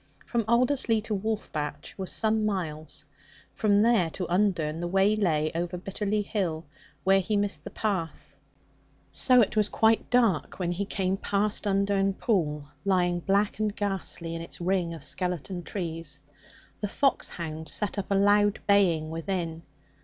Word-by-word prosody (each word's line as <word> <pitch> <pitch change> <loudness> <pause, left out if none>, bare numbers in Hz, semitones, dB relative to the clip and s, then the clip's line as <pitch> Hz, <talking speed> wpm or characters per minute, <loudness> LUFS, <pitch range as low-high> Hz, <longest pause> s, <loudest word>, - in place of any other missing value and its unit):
From 235 -2 -1
Alderslea 235 0 +3
to 220 - -3
Wolf 215 +2 -2
batch 150 -1 -4
was 190 -2 -4
some 220 -1 +2
miles; 155 -7 -3 0.5
from 205 -1 +3
there 220 -7 +3
to 180 +3 -4
Undern 170 -6 +1
the 175 - -2
way 195 +3 +3
lay 155 -7 +1
over 175 +2 -2
Bitterly 205 +3 -2
Hill, 175 -7 -2 0.4
where 195 0 +5
he 205 +3 0
missed 205 0 0
the - - -6
path. 185 -7 -3 0.8
So 250 -2 +5
it 215 - +1
was 210 -1 +2
quite 225 0 +2
dark 230 -10 +2
when 175 -2 -1
he 190 +3 -2
came 190 -1 -1
past 205 +2 -1
Undern 195 0 +1
Pool, 150 -11 0 0.2
lying 180 -2 +2
black 200 +4 +1
and 215 -1 0
ghastly 190 -4 -3
in 165 - -4
its 165 - -9
ring 175 -1 0
of 155 - -10
skeleton 180 +1 -3
trees. 165 -5 -5 0.6
The 205 - -2
foxhound 165 - -1
set 210 -1 0
up 195 - -5
a 200 - +2
loud 205 +1 +4
baying 175 -6 +3
within. 165 -1 -3
195 Hz, 155 wpm, -27 LUFS, 170-210 Hz, 0.8 s, where